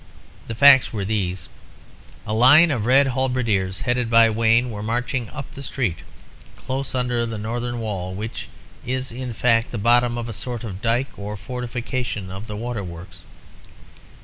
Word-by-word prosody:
The 115 - -5
facts 140 +1 +7
were 105 -4 -3
these. 95 -5 -2 0.8
A 110 - -3
line 145 +9 +6
of 120 -5 -1
red 135 +2 +5
halberdiers, 120 -8 -1
headed 125 -2 0
by 115 -1 +6
Wayne, 115 +2 +3
were 105 -1 -6
marching 120 +1 -2
up 140 -3 -8
the 140 - -9
street, 120 - -2 0.6
close 135 +1 -4
under 125 -2 0
the 115 -1 -4
northern 120 +3 -3
wall, 95 -5 -4
which 110 +3 -6 0.4
is, 130 0 -3
in 125 +1 -5
fact, 115 0 +2
the 120 - -5
bottom 120 +2 +3
of 120 -1 -4
a 115 - -5
sort 120 +3 -5
of 100 -4 -7
dyke 120 +4 0
or 105 +1 -5
fortification 125 -4 -4
of 95 +4 -7
the 105 -2 -6
Waterworks. 95 -6 -6
115 Hz, 160 wpm, -22 LUFS, 105-125 Hz, 0.8 s, facts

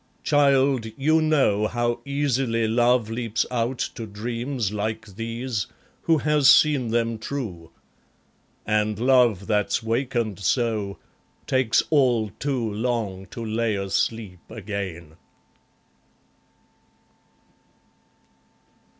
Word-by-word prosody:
Child, 140 -4 +3
you 155 +4 +3
know 135 -10 +2
How 120 +1 -1
easily 135 -5 0
love 120 0 +2
leaps 115 -1 -1
out 120 +1 -1 0.2
to 115 - -7
dreams 115 +2 -3
like 110 +2 -3
these, 115 -1 -3 0.3
Who 165 -1 +3
has 150 -1 +3
seen 145 -5 +5
them 115 -1 0
true. 110 - -5 1.0
And 105 -1 +1
love 120 -5 +3
that's 105 +1 0
wakened 115 -3 -1
so 105 -1 0 0.5
Takes 130 -3 +2
all 125 -8 +3
too 130 -5 -1
long 105 -4 -2
to 115 +5 -7
lay 110 0 0
asleep 100 0 -2
again. 95 -6 -6
115 Hz, 95 wpm, -24 LUFS, 105-130 Hz, 1.0 s, seen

